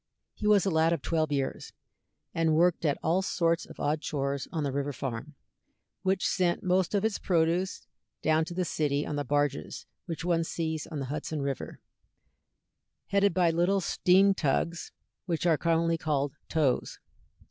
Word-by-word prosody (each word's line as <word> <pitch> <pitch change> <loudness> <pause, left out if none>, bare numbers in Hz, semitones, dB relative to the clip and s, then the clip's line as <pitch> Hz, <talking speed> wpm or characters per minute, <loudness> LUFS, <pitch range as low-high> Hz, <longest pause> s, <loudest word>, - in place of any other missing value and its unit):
He 210 - -3
was 205 -2 +5
a 195 - +1
lad 160 +1 +3
of 170 - -3
twelve 155 -2 0
years, 135 -2 -2 0.6
and 165 -1 +2
worked 170 +1 +3
at 145 -2 +2
all 170 +4 +2
sorts 170 -3 0
of - - -13
odd 150 +1 0
chores 140 -2 -2
on 160 -3 -2
the 140 - -1
river 140 +1 -2
farm, 135 +3 -5 0.7
which 190 0 +1
sent 180 -2 +1
most 185 +2 +1
of 200 +1 +1
its 220 -2 0
produce 175 +1 0 0.4
down 160 0 +3
to 175 +1 -7
the 185 0 0
city 145 -2 0
on 150 - -3
the 145 - -1
barges 145 +1 -1 0.2
which 165 -1 -4
one 170 -2 +2
sees 160 -2 -3
on 160 - -6
the 135 - -3
Hudson 155 -1 -3
River, 140 -1 -4 1.3
headed 200 0 +3
by 175 -2 +4
little 175 +4 +2
steam 190 +2 +4
tugs, 170 +1 -1
and - - -53
which 170 -1 -1
are 165 -2 +5
commonly 165 +1 +1
called 145 -3 -1 0.2
"tows." 145 -6 0
165 Hz, 170 wpm, -29 LUFS, 145-180 Hz, 1.3 s, was